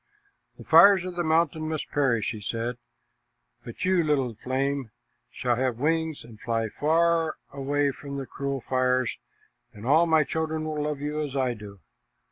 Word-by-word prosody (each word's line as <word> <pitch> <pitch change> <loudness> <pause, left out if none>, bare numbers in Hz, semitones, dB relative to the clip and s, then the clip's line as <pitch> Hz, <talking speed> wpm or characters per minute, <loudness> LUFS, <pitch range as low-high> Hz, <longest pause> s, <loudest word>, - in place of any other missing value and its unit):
"The - - -11
fires 195 -3 +7
of 180 -1 -6
the 175 - -1
mountain 160 -1 +1
must 155 -2 -3
perish," 130 -7 +1
he 110 - -7
said, 115 +4 -3 0.9
"but 120 - -6
you 185 -2 +3
little, 145 -5 +1
gentle 110 - -26
flame, 135 -1 -1 0.4
shall 120 -2 -1
have 130 -2 0
wings 160 +2 -1
and 115 -2 -14
fly 115 -1 -1
far 165 +3 +1 0.2
away 140 +1 0
from 140 +1 -8
the 135 - -4
cruel 140 0 -4
fires, 130 -1 +1 0.6
and 105 +2 -11
all 160 +6 +4
my 160 -1 +4
children 160 +1 -2
will 155 -1 -3
love 150 -1 -3
you 150 +1 -2
as 145 -2 -4
I 130 -2 +1
do." 100 -4 -11
140 Hz, 170 wpm, -26 LUFS, 125-160 Hz, 0.9 s, fires